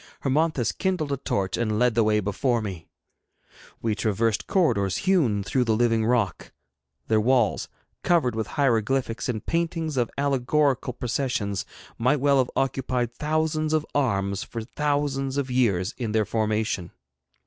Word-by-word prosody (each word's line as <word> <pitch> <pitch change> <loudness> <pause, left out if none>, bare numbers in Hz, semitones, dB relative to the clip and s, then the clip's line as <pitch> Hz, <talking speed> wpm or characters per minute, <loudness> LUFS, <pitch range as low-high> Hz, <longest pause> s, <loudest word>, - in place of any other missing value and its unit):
Hermonthis 145 -2 +1
kindled 180 -7 -1
a 140 - 0
torch 100 -7 -2
and 110 -2 0
led 125 0 +3
the 115 0 +3
way 105 0 +3
before 105 +5 0
me. 95 -7 -6 1.0
We 115 -1 +1
traversed 110 +1 0
corridors 115 - +1
hewn 140 - +2
through 125 +5 +1
the 110 -1 +2
living 115 -1 +2
rock. 115 -7 0 0.6
Their 110 -1 +3
walls, 120 -2 +2 0.3
covered 160 -9 +2
with 110 0 -2
hieroglyphics 125 -1 +1
and 110 -4 -3
paintings 165 -3 -1
of 120 -2 +1
allegorical 140 -1 +1
processions, 120 -5 -2 0.3
might 130 +5 +2
well 140 0 +3
have 130 - +1
occupied 130 -3 -1
thousands 155 +2 0
of 155 -1 +1
arms 100 -8 0
for 115 -2 -6
thousands 140 0 -1
of 135 -2 -1
years 100 -8 +1
in 115 -4 -2
their 110 -1 +2
formation. 110 -4 -1
125 Hz, 145 wpm, -25 LUFS, 110-140 Hz, 1.0 s, led